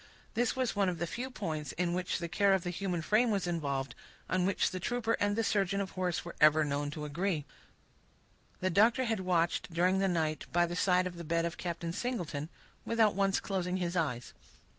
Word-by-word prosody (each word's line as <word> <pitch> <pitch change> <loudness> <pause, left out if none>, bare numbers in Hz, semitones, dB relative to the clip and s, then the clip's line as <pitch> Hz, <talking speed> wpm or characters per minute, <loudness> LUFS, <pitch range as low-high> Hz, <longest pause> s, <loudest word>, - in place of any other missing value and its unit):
This 240 +2 +1
was 255 -3 0
one 200 -2 +2
of 175 - -3
the 170 - -1
few 245 +9 -4
points, 160 - -4
in 175 0 0
which 180 0 -1
the 170 - -4
care 195 +3 +3
of 185 - -2
the 175 - -2
human 180 -2 -2
frame 220 +8 +3
was 200 -4 0
involved, 140 -7 -2 0.3
on 185 0 +1
which 195 - +1
the 185 - -4
trooper 230 +3 -1
and 205 0 +1
the 225 - +1
surgeon 200 -2 +1
of 195 -1 -3
horse 180 -2 -2
were 170 - -7
ever 155 0 +6
known 145 0 -1
to 150 0 -5
agree. 160 0 -1 1.2
The 185 0 +1
doctor 225 +8 +4
had 225 -3 0
watched, 175 -2 0
during 180 +3 +2
the 195 - +2
night, 160 -4 -1
by 175 0 +3
the 175 0 -4
side 180 0 +3
of 180 -1 -5
the 170 - -6
bed 165 +1 0
of 170 -1 -4
Captain 170 -1 -3
Singleton, 170 - -3 0.3
without 225 -2 +3
once 195 0 +2
closing 185 -2 -2
his 175 -1 -2
eyes. 125 -8 -1
180 Hz, 210 wpm, -32 LUFS, 165-200 Hz, 1.2 s, ever